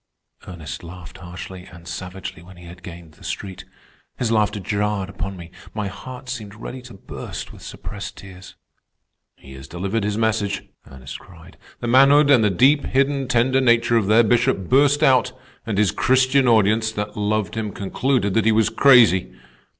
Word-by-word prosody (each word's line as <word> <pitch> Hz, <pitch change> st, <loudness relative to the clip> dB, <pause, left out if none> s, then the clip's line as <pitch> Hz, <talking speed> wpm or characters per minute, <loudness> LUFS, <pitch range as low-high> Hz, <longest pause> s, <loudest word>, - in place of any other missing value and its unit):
Ernest 85 Hz, -4 st, -8 dB
laughed 90 Hz, 0 st, -11 dB
harshly 90 Hz, +1 st, -9 dB
and 85 Hz, -1 st, -14 dB
savagely 90 Hz, -2 st, -7 dB
when 90 Hz, +1 st, -15 dB
he 90 Hz, -, -13 dB
had 90 Hz, +1 st, -12 dB
gained 85 Hz, -2 st, -11 dB
the -, -, -20 dB
street. 95 Hz, -2 st, -6 dB, 0.5 s
His 120 Hz, -3 st, -1 dB
laughter 105 Hz, -1 st, +1 dB
jarred 100 Hz, 0 st, -2 dB
upon 95 Hz, 0 st, -6 dB
me. 85 Hz, -1 st, -11 dB, 0.2 s
My 105 Hz, -2 st, -2 dB
heart 125 Hz, +6 st, -10 dB
seemed 110 Hz, -5 st, -6 dB
ready 125 Hz, +4 st, -8 dB
to 125 Hz, -4 st, -13 dB
burst 95 Hz, -, -8 dB
with -, -, -14 dB
suppressed 100 Hz, -1 st, -8 dB
tears. 95 Hz, -1 st, -12 dB, 0.8 s
"He 65 Hz, -, -14 dB
has 65 Hz, 0 st, -11 dB
delivered 95 Hz, +7 st, -3 dB
his 105 Hz, +1 st, -2 dB
message," 110 Hz, -3 st, -1 dB, 0.3 s
Ernest 65 Hz, 0 st, -9 dB
cried. 85 Hz, -3 st, -16 dB, 0.3 s
"The 120 Hz, -, -3 dB
manhood 140 Hz, +4 st, +5 dB
and 125 Hz, -5 st, +5 dB
the 105 Hz, -, +3 dB
deep 135 Hz, +10 st, +3 dB
hidden, 135 Hz, 0 st, 0 dB
tender 130 Hz, +1 st, +2 dB
nature 120 Hz, -1 st, +3 dB
of 110 Hz, -4 st, +2 dB
their 110 Hz, +3 st, +5 dB
Bishop 120 Hz, -4 st, +1 dB
burst 145 Hz, +2 st, +4 dB
out, 130 Hz, -1 st, +3 dB, 0.3 s
and 105 Hz, -3 st, -2 dB
his 105 Hz, -2 st, +3 dB
Christian 130 Hz, +1 st, +2 dB
audience, 110 Hz, 0 st, +3 dB
that 105 Hz, 0 st, -5 dB
loved 105 Hz, -2 st, -1 dB
him, 110 Hz, -2 st, -3 dB
concluded 100 Hz, +2 st, -1 dB
that 110 Hz, +1 st, +1 dB
he 110 Hz, -, +4 dB
was 110 Hz, -1 st, +2 dB
crazy! 115 Hz, -10 st, +5 dB
105 Hz, 175 wpm, -21 LUFS, 95-120 Hz, 0.8 s, manhood